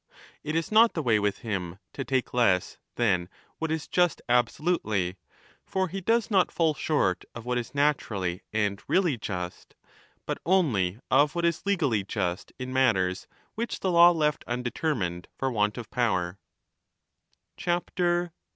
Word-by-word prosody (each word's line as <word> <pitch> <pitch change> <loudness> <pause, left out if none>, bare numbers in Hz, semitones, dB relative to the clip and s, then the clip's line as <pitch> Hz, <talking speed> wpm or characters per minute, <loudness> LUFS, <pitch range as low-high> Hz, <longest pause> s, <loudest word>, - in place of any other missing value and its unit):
It 155 +1 -3
is 165 +4 -1
not 225 +2 +6
the 160 - -1
way 115 -4 +3
with 100 -1 -1
him 95 -5 -3 0.2
to 135 - -4
take 130 -1 -1
less 105 -7 +2 0.2
than 95 -7 +1 0.3
what 160 - -2
is 160 -1 -2
just 175 -4 +2
absolutely; 120 - +1 0.5
for 190 -1 -1
he 195 +3 -5
does 225 +3 +1
not 190 -3 +3
fall 160 -2 +2
short 140 - 0
of 120 -1 -8
what 125 0 0
is 120 +3 -7
naturally 105 -11 0
and 105 -2 0
really 180 -7 +2
just, 90 -5 -6 0.5
but - - -3
only 120 - +2
of 145 +4 +4
what 170 0 0
is 170 +3 -1
legally 140 - +1
just 95 -2 -3
in 130 0 -5
matters 95 -9 +2 0.3
which 235 +1 -4
the 190 - +1
law 170 0 +8
left 150 -3 +1
undetermined 120 - -2
for 135 0 -1
want 105 -1 0
of 120 -3 -6
power. 95 -7 0
125 Hz, 150 wpm, -27 LUFS, 100-160 Hz, 0.5 s, law